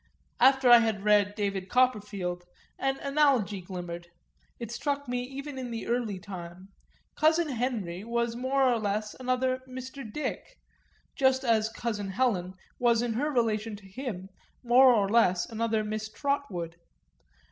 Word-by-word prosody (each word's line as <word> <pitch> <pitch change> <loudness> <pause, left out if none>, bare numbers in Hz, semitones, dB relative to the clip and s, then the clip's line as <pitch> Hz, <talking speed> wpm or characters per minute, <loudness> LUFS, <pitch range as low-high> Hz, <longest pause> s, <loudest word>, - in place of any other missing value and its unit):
After 265 0 +5
I 240 - +10
had 220 -4 -1
read 205 -1 +3
David 195 -2 -2
Copperfield 205 -8 0 0.3
an 270 0 0
analogy 275 -9 +2
glimmered 175 -1 -7 0.5
it 235 -2 -6
struck 285 +3 -2
me 245 0 -1
even 270 +2 -7
in 250 -1 -5
the 230 -1 -5
early 235 -4 -1
time: 185 -1 -9 0.5
cousin 320 +1 +3
Henry 225 -8 -2
was 235 0 -1
more 260 +3 +1
or 245 -3 +3
less 210 0 -2
another 255 0 0
Mr. 260 -2 -8
Dick, 300 - -5 0.6
just 265 0 +3
as 225 -3 +2
cousin 220 -3 -3
Helen 190 -4 0 0.2
was 235 -1 +3
in 240 -2 -1
her 285 +7 0
relation 225 -5 0
to 200 -1 -14
him 195 -3 -6 0.3
more 250 +2 +7
or 210 -5 +3
less 190 -5 +3
another 225 -1 -1
Miss 215 0 -4
Trotwood. 205 - -3
230 Hz, 145 wpm, -28 LUFS, 200-260 Hz, 0.6 s, I